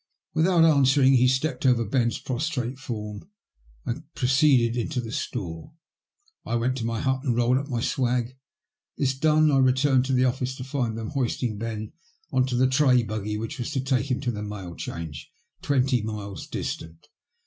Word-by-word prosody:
Without 170 Hz, +1 st, +4 dB
answering 135 Hz, -3 st, +5 dB
he 125 Hz, -1 st, +5 dB
stepped 130 Hz, +1 st, 0 dB
over 125 Hz, -3 st, +3 dB
Ben*s 120 Hz, +1 st, +1 dB
prostrate 130 Hz, -1 st, -3 dB
form 105 Hz, -, -6 dB, 0.6 s
and -, -, -5 dB
proceeded 130 Hz, -3 st, +3 dB
into 125 Hz, +3 st, -2 dB
the 115 Hz, -2 st, -5 dB
store. 105 Hz, -, -5 dB, 0.7 s
I 120 Hz, -, -2 dB
went 120 Hz, +2 st, 0 dB
to 115 Hz, -, -3 dB
my 115 Hz, -1 st, -2 dB
hut 130 Hz, 0 st, 0 dB
and 120 Hz, -4 st, 0 dB
rolled 120 Hz, +2 st, +3 dB
up 140 Hz, -, -6 dB
my 120 Hz, -5 st, -2 dB
swag. 125 Hz, 0 st, 0 dB, 0.6 s
This 135 Hz, -2 st, +1 dB
done, 155 Hz, +2 st, +3 dB
I 135 Hz, -, +4 dB
returned 130 Hz, 0 st, +3 dB
to 135 Hz, -, -1 dB
the 130 Hz, 0 st, +3 dB
office, 130 Hz, 0 st, -1 dB
to 130 Hz, -, -7 dB
find 125 Hz, -4 st, -2 dB
them 110 Hz, -1 st, -4 dB
hoisting 120 Hz, -5 st, -1 dB
Ben 110 Hz, -1 st, -5 dB, 0.4 s
into 130 Hz, -1 st, +1 dB
the 125 Hz, +2 st, +4 dB
tray 130 Hz, -2 st, +4 dB
buggy 105 Hz, -1 st, -3 dB
which 115 Hz, +6 st, -5 dB
was 120 Hz, -, -3 dB
to 135 Hz, -, 0 dB
take 130 Hz, 0 st, 0 dB
him 125 Hz, -, 0 dB
to 125 Hz, -3 st, -1 dB
the 105 Hz, -2 st, -5 dB
Mail 100 Hz, -4 st, -6 dB
Change, 80 Hz, -4 st, -7 dB, 0.3 s
twenty 130 Hz, -3 st, +2 dB
miles 105 Hz, -2 st, -6 dB
distant. 80 Hz, 0 st, -6 dB
125 Hz, 175 wpm, -25 LUFS, 115-135 Hz, 0.7 s, answering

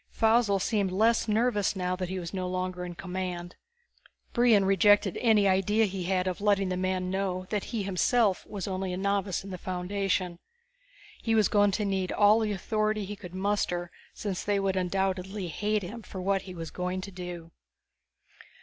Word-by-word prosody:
Faussel 225 Hz, -2 st, +3 dB
seemed 200 Hz, -1 st, 0 dB
less 225 Hz, +5 st, +2 dB
nervous 215 Hz, -2 st, +1 dB
now 180 Hz, -1 st, -1 dB
that 185 Hz, -1 st, -4 dB
he 190 Hz, -, -3 dB
was 170 Hz, -1 st, -5 dB
no 185 Hz, -1 st, -2 dB
longer 185 Hz, 0 st, -3 dB
in 175 Hz, -1 st, -6 dB
command. 180 Hz, -1 st, -5 dB, 0.8 s
Brion 235 Hz, -5 st, +4 dB
rejected 195 Hz, 0 st, +4 dB
any 215 Hz, -4 st, +4 dB
idea 195 Hz, +4 st, +3 dB
he 190 Hz, -3 st, -4 dB
had 185 Hz, 0 st, +1 dB
of 185 Hz, +1 st, -3 dB
letting 200 Hz, -2 st, +2 dB
the 185 Hz, -, -1 dB
man 185 Hz, 0 st, -1 dB
know 190 Hz, -1 st, -2 dB
that 210 Hz, -2 st, -1 dB
he 225 Hz, -4 st, -3 dB
himself 195 Hz, +2 st, +2 dB
was 200 Hz, -3 st, -5 dB
only 190 Hz, -1 st, -2 dB
a -, -, -3 dB
novice 200 Hz, -1 st, 0 dB
in 195 Hz, -, -8 dB
the 185 Hz, -, -6 dB
foundation. 185 Hz, -1 st, -2 dB, 0.8 s
He 225 Hz, -1 st, +1 dB
was 215 Hz, -2 st, +4 dB
going 205 Hz, -1 st, +4 dB
to 210 Hz, +1 st, 0 dB
need 190 Hz, -2 st, -1 dB
all 210 Hz, +1 st, +5 dB
the 215 Hz, -2 st, 0 dB
authority 215 Hz, +1 st, -1 dB
he 205 Hz, +2 st, -6 dB
could 185 Hz, -3 st, -10 dB
muster, 185 Hz, -3 st, -1 dB, 0.2 s
since 195 Hz, -3 st, -4 dB
they 205 Hz, -1 st, +1 dB
would 195 Hz, -1 st, 0 dB
undoubtedly 190 Hz, +1 st, -1 dB
hate 210 Hz, +5 st, -1 dB
him 220 Hz, +6 st, -7 dB
for 195 Hz, -, -8 dB
what 195 Hz, +1 st, +1 dB
he 185 Hz, -1 st, -9 dB
was 165 Hz, -2 st, -6 dB
going 180 Hz, +1 st, -3 dB
to 200 Hz, +1 st, -8 dB
do. 175 Hz, -2 st, -7 dB
195 Hz, 185 wpm, -28 LUFS, 185-205 Hz, 0.8 s, all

